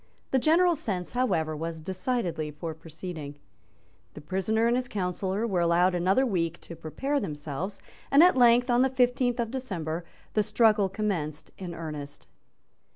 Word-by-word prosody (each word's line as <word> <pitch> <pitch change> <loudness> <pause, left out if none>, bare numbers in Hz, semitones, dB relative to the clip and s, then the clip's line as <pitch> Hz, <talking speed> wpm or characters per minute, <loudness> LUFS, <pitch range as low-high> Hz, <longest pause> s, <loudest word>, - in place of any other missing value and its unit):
The 265 - +3
general 340 +6 +4
sense, 195 - -3
however, 175 -11 0
was 165 +1 -4
decidedly 185 -2 -2
for 160 +2 -6
proceeding. 160 -2 -8 0.8
The 150 - -8
prisoner 190 +8 0
and 235 +1 +3
his 250 0 -1
counsel 190 -3 -2
were 195 -1 0
allowed 175 +2 +3
another 185 +9 +2
week 170 -7 -1
to 170 - -9
prepare 270 - -2
themselves; 155 - -5 0.3
and, 280 +4 +7
at 360 - +6
length, 245 0 +5
on 240 +1 +4
the 265 - +4
fifteenth 250 -1 +1
of 230 -1 -1
December, 180 -11 -4 0.3
the 215 - +3
struggle 210 -2 +3
commenced 180 -7 -3
in 175 -3 -7
earnest. 150 -3 -7
190 Hz, 155 wpm, -28 LUFS, 165-245 Hz, 0.8 s, and